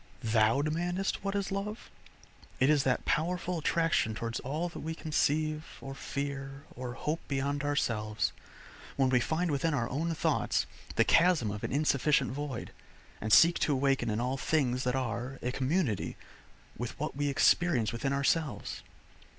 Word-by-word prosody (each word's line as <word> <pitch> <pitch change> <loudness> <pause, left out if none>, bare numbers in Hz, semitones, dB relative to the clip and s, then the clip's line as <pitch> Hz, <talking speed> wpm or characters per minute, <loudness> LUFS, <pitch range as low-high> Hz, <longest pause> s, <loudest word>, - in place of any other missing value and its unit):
Thou 115 +4 +3
demandest 175 +6 -1
what 200 0 -2
is 200 -1 -1
love? 205 +3 -4 0.7
It 130 +3 +5
is 150 -2 +4
that 130 -1 +1
powerful 175 +2 0
attraction 160 -8 +1
towards 115 +2 -3
all 155 +7 -2
that - - -8
we 160 +1 -4
conceive, 155 0 -1
or 135 - -7
fear, 140 0 -5
or 125 -1 -5
hope 150 +6 -2
beyond 140 +1 -1
ourselves, 110 -7 0 0.6
when 135 -1 +3
we 125 -1 +4
find 160 +7 0
within 150 +2 +1
our 120 -3 0
own 160 +6 -1
thoughts - - +1 0.3
the - - +5
chasm 165 - +4
of 105 +1 -6
an - - -2
insufficient 140 -2 +2
void, 135 -3 -5 0.5
and 110 - -3
seek 170 +7 +7
to 150 - +2
awaken 135 -2 +1
in 105 +1 -1
all 125 +3 -1
things 130 -4 0
that 125 +1 +1
are, 125 +1 -3
a 125 - 0
community 130 - -1 0.6
with - - -5
what - - -3
we 145 +1 0
experience 140 -4 +3
within 135 +4 -1
ourselves. 140 +1 0
140 Hz, 160 wpm, -31 LUFS, 125-160 Hz, 0.7 s, seek